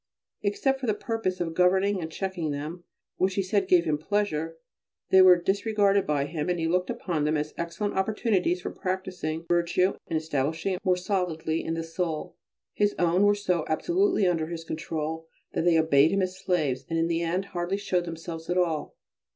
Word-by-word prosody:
Except 265 +7 0
for 260 - -4
the 215 - +2
purpose 225 -5 -2
of 165 -2 -2
governing 190 +3 +3
and 160 0 -5
checking 185 -3 -3
them, 150 +5 -5 0.3
which 185 0 +1
he 195 - +1
said 195 0 0
gave 180 -2 +4
him 150 -1 0
pleasure, 165 -4 -1 0.5
they 190 - +8
were 180 -1 +8
disregarded 200 +1 +2
by 145 -2 +1
him; 155 +2 -3
and 180 - +1
he 165 - 0
looked 180 +2 +1
upon 180 -10 -2
them 150 +1 +1
as 150 +1 -3
excellent 170 +5 -3
opportunities 190 -3 +1
for - - -3
practising 180 -4 -4
virtue 175 +2 +2
and 160 - 0
establishing 160 +4 -1
it 185 - -5
more 185 -2 +2
solidly 180 -4 -1
in 165 - -2
the 165 - -3
soul. 165 +1 -3 0.4
His 205 0 +1
own 175 +2 +2
were 205 0 +5
so 180 -5 0
absolutely 350 - +2
under 165 -3 +1
his 165 -1 -6
control 160 0 -4 0.3
that - - -1
they 170 -2 +5
obeyed 155 -2 +5
him 195 +1 +1
as 185 0 -2
slaves, 155 -9 -1
and 165 - -1
in 165 - +2
the 165 0 0
end 175 +3 -1
hardly 175 +2 -1
showed 185 -3 -1
themselves 165 0 -7
at 175 - +1
all. 165 -4 0
175 Hz, 190 wpm, -27 LUFS, 160-190 Hz, 0.5 s, they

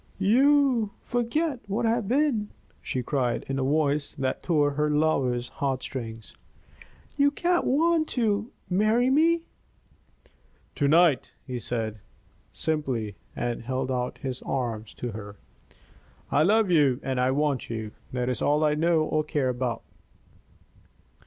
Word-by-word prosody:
"You 255 +2 +4
forget 250 +4 -1
what 215 +4 -1
I 225 - +3
have 230 -3 -1
been!" 250 -4 +1 0.3
she 130 - -3
cried, 125 -2 -1
in 135 0 -2
a - - 0
voice 145 +1 +1
that 130 -1 -2
tore 150 -4 +2
her 150 +1 0
lover's 135 -5 +1
heartstrings. 130 -4 -4 0.8
"You 285 0 +5
can't 345 +4 0
want 320 +3 +2
to 215 -1 +1 0.2
marry 215 +7 +2
me?" 330 +4 +3 1.3
"To 145 - +1
night," 160 -1 +4
he 125 -2 -4
said, 110 -3 -3 0.5
simply, 130 -10 -2 0.2
and 120 -1 -2
held 130 +2 -2
out 125 -1 -2
his 130 -2 -5
arms 115 -5 -3
to 120 - -4
her. 105 -1 -8 1.0
"I - - +3
love 205 +3 +3
you 140 -6 +4
and 130 -1 -1
I 125 +1 +2
want 140 -1 0
you. 110 -2 -4 0.2
That 125 -1 -2
is 125 - -2
all 150 +2 +2
I 150 -1 +3
know 160 +1 +2
or 155 0 0
care 145 -3 0
about." 125 -1 -2
150 Hz, 140 wpm, -26 LUFS, -, 1.3 s, You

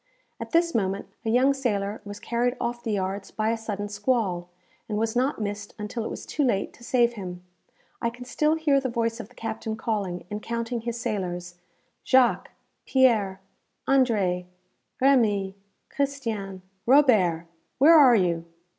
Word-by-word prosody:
At - - -6
this 335 0 +2
moment 195 -2 -1
a 225 - -2
young 255 +4 +4
sailor 210 -6 -2
was 205 0 -8
carried 245 +2 -1
off 240 0 -3
the 225 -3 -1
yards 195 0 -2
by 215 +1 -1
a - - +1
sudden 210 -2 -4
squall, 205 -5 -1 0.4
and 210 - -1
was 220 +1 -1
not 260 +2 +1
missed 205 -1 -5
until 215 +2 -4
it - - -4
was - - -7
too 295 - -1
late 200 -7 0
to 240 - -17
save 240 -1 +2
him. 180 -4 -7 0.6
I 235 - +1
can 245 +2 -11
still 300 +4 +1
hear 300 -4 +3
the 265 -1 -2
voice 230 0 -1
of 225 -2 -8
the - - -22
captain 220 -1 -4
calling, 200 -6 -3
and 210 0 -4
counting 235 +1 -3
his 235 0 -4
sailors 180 -6 -3 0.5
"Jacques, 260 -2 +3 0.4
Pierre, 215 -8 +3 0.5
André, 210 -10 +2 0.5
Remy, 215 -8 +3 0.4
Christian, 225 -10 -3 0.2
Robert, 215 - +4 0.3
where 295 +6 +7
are 275 -7 +8
you?" 170 -4 +1
225 Hz, 160 wpm, -26 LUFS, 200-250 Hz, 0.6 s, are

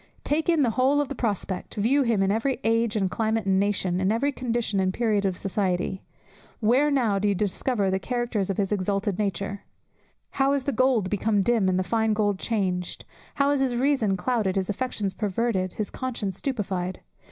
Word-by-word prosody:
Take 310 +3 0
in 325 -4 +4
the 240 - +2
whole 265 +5 +2
of 290 -2 -1
the - - -3
prospect, 205 -6 -3
view 235 +7 +2
him 230 -6 +2
in 195 - +2
every 230 +4 0
age, 225 0 +1
and 195 -3 +1
climate, 220 -1 0
and 190 -1 +3
nation, 190 -3 0
in 190 +2 +2
every 265 +6 +1
condition 235 -6 -1
and 185 -1 +2
period 210 -1 0
of 185 -2 0
society. 190 -1 -1 0.6
Where 250 +7 +3
now 235 -8 +2
do 205 - +1
you 200 - +2
discover 200 +1 0
the 190 - 0
characters 240 -3 -2
of 195 - -1
his 200 -1 0
exalted 200 0 -1
nature? 200 0 -2 0.7
"How 275 0 +2
is 280 -2 0
the 280 - -1
gold 240 -6 +2
become 205 0 +1
dim, 220 -3 +2
and 185 - +1
the 185 - +1
fine 220 +3 +1
gold 205 -2 0
changed?" 185 -6 -2 0.3
How 280 0 +2
is 285 - +1
his 260 -2 +1
reason 240 -6 +2
clouded, 210 -2 0
his 190 0 0
affections 205 -3 -3
perverted; 200 -2 -1
his 215 - -4
conscience 230 -7 -3
stupified! 190 -9 -3
210 Hz, 195 wpm, -25 LUFS, 195-245 Hz, 0.7 s, in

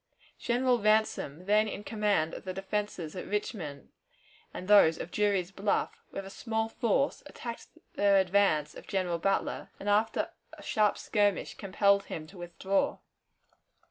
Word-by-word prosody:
General 245 0 +2
Ransom, 215 -7 +1
then 210 +2 +4
in 205 0 -5
command 205 -7 0
of - - -7
the 185 - -4
defenses 195 -4 -3
at 180 - -6
Richmond 185 - -4 0.6
and 185 - -7
those 200 -6 +6
of 170 - -6
Drury's 200 -3 +1
Bluff, 200 +1 -1
with 195 - -6
a 195 - -9
small 220 0 -2
force, 240 +4 0
attacked 235 -5 -7 0.3
the 200 -1 +3
advance 190 -6 +2
of - - -12
General 180 -3 -1
Butler, 195 +3 -1
and 200 - -7
after 215 +2 +1 0.2
a - - -12
sharp 210 -1 +2
skirmish 205 -3 0
compelled 200 0 +2
him 155 - -6
to 180 +4 -14
withdraw. 180 +3 -1
200 Hz, 145 wpm, -30 LUFS, 185-210 Hz, 0.6 s, those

